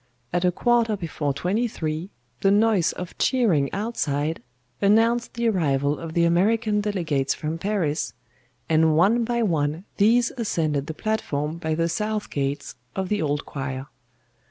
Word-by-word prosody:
At 175 Hz, 0 st, +1 dB
a 180 Hz, -, +4 dB
quarter 230 Hz, +2 st, +2 dB
before 160 Hz, -5 st, -2 dB
twenty 200 Hz, -, 0 dB
three, 160 Hz, -3 st, -4 dB, 0.3 s
the 195 Hz, -, +3 dB
noise 205 Hz, -3 st, +3 dB
of 180 Hz, -1 st, -7 dB
cheering 190 Hz, -, +2 dB
outside 160 Hz, -, -2 dB, 0.4 s
announced 230 Hz, +5 st, +3 dB
the 235 Hz, 0 st, 0 dB
arrival 145 Hz, -8 st, +1 dB
of 165 Hz, -1 st, -7 dB
the 170 Hz, -, +4 dB
American 210 Hz, +5 st, +2 dB
delegates 165 Hz, -10 st, 0 dB
from 160 Hz, +2 st, -4 dB
Paris, 170 Hz, -7 st, -1 dB, 0.5 s
and 160 Hz, -1 st, +3 dB
one 215 Hz, +8 st, +4 dB
by 235 Hz, 0 st, 0 dB
one 160 Hz, -2 st, 0 dB
these 230 Hz, +3 st, +4 dB
ascended 155 Hz, -, -1 dB
the 160 Hz, -, -5 dB
platform 160 Hz, -8 st, -2 dB
by 160 Hz, -2 st, -1 dB
the 165 Hz, +1 st, +1 dB
south 210 Hz, +4 st, -2 dB
gates 140 Hz, 0 st, -2 dB, 0.2 s
of 190 Hz, -1 st, -2 dB
the 210 Hz, -1 st, 0 dB
Old 145 Hz, -1 st, -1 dB
Choir. 135 Hz, 0 st, -5 dB
175 Hz, 150 wpm, -24 LUFS, 150-215 Hz, 0.5 s, a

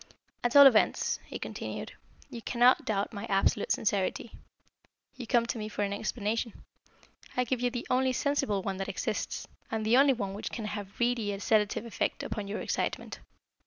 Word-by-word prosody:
"At 245 Hz, +1 st, 0 dB
all 285 Hz, 0 st, +11 dB
events," 240 Hz, -6 st, +4 dB
he -, -, -5 dB
continued, -, -, -6 dB, 0.4 s
"you 235 Hz, -3 st, -7 dB
cannot 245 Hz, +2 st, +4 dB
doubt 200 Hz, -1 st, -1 dB
my 200 Hz, -, -5 dB
absolute 195 Hz, +1 st, +1 dB
sincerity. 205 Hz, +2 st, 0 dB, 0.8 s
You 250 Hz, -3 st, -8 dB
come 235 Hz, -1 st, +3 dB
to 235 Hz, -, -3 dB
me 215 Hz, 0 st, -4 dB
for 210 Hz, -, -2 dB
an 200 Hz, 0 st, -1 dB
explanation. 220 Hz, +1 st, -2 dB, 0.8 s
I 250 Hz, -, +3 dB
give 250 Hz, 0 st, -2 dB
you 245 Hz, -, +2 dB
the 245 Hz, -1 st, -5 dB
only 260 Hz, +1 st, +2 dB
sensible 255 Hz, -7 st, 0 dB
one 195 Hz, 0 st, -3 dB
that 195 Hz, -, -4 dB
exists, -, -, -3 dB, 0.2 s
and 220 Hz, -1 st, -2 dB
the 230 Hz, +3 st, +5 dB
only 275 Hz, 0 st, +6 dB
one 200 Hz, -6 st, -3 dB
which 205 Hz, -, -5 dB
can 225 Hz, -, -5 dB
have 210 Hz, -1 st, -4 dB
a 195 Hz, -, -24 dB
really 235 Hz, -4 st, 0 dB
sedative 210 Hz, +1 st, +1 dB
effect 230 Hz, -, -2 dB
upon 210 Hz, -2 st, -4 dB
your 205 Hz, +2 st, -4 dB
excitement. -, -, -3 dB
220 Hz, 180 wpm, -30 LUFS, 205-245 Hz, 0.8 s, all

